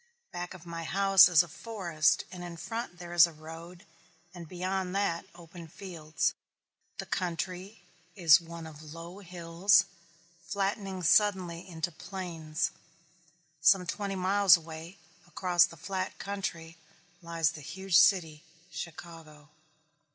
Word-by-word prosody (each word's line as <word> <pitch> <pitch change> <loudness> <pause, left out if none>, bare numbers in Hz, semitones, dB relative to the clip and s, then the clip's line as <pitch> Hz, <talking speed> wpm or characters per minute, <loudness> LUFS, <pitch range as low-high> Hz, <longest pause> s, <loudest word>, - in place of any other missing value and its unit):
Back 175 +1 -6
of 175 -2 -14
my 170 -1 -6
house 195 +1 +6
is 175 -1 +6
a - - -10
forest 170 -3 0
and 180 -1 -8
in 175 -1 -8
front 190 +2 -5
there 175 0 -8
is 175 0 +8
a - - -10
road 165 +3 -11 0.5
and 175 -2 -9
beyond 185 +1 -3
that 195 -4 -1
open 170 0 -12
fields. 160 -3 -3 0.6
The - - -5
country 180 +2 -4 0.3
is 170 -4 +6
one 170 0 -9
of 155 0 -11
low 170 +3 -9
hills, 175 +1 +2 0.6
flattening 195 +1 -3
suddenly 185 -2 +2
into 165 0 -3
plains. 165 -3 -4 0.9
Some 180 +4 +5
twenty 200 +2 -3
miles 190 -1 +5
away, 165 +3 -10 0.3
across 175 0 +3
the 165 - -12
flat 185 +3 -4
country, 170 -5 -5 0.4
lies 165 -3 0
the 160 -2 -10
huge 190 +5 -3
city, 165 -6 +3 0.3
Chicago. 160 -3 -9
175 Hz, 130 wpm, -30 LUFS, 165-190 Hz, 0.9 s, is